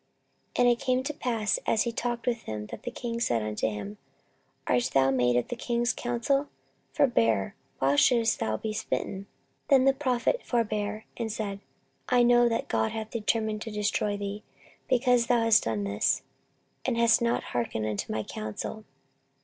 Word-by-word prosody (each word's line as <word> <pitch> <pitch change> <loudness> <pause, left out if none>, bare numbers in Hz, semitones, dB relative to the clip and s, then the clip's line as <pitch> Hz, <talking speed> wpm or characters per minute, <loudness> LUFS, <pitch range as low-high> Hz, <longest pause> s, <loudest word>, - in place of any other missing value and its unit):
14:025:016 - - -4
And - - +5
it 240 -1 +3
came 255 0 +1
to 300 +3 -3
pass, 230 -7 0
as 220 - +3
he 235 - -2
talked 235 0 -3
with 235 -2 0
him, 105 -1 -4
that - - -7
the - - -4
king 235 -2 -4
said 120 - +1
unto 105 0 -1
him, 105 -1 -5 0.7
Art 125 -1 +2
thou 135 0 +5
made 125 -2 +2
of 120 - 0
the - - -3
king's 240 0 0
counsel? 250 +4 0 0.4
forbear; 115 - +2 0.2
why 135 +1 +2
shouldest 230 - +4
thou 110 0 -1
be 215 - -4
smitten? 195 -2 -3 0.4
Then 270 -2 +5
the 270 - +5
prophet 265 - 0
forbare, 215 -3 -1
and 230 -2 -2
said, 205 -2 -4 0.5
I 245 -1 +5
know 240 0 +5
that 230 - -1
God 110 -1 0
hath 220 -1 -5
determined 220 -1 -1
to 225 - -5
destroy 210 -1 -1
thee, 200 +1 -5 0.5
because 245 -2 +3
thou 240 -2 +3
hast 225 -1 +5
done 110 -2 -1
this, 100 +1 +1 0.6
and 230 - 0
hast 235 0 +4
not 235 0 +1
hearkened 115 -2 -1
unto 105 -2 -3
my 110 0 -1
counsel. 110 - -6
220 Hz, 175 wpm, -28 LUFS, -, 0.7 s, And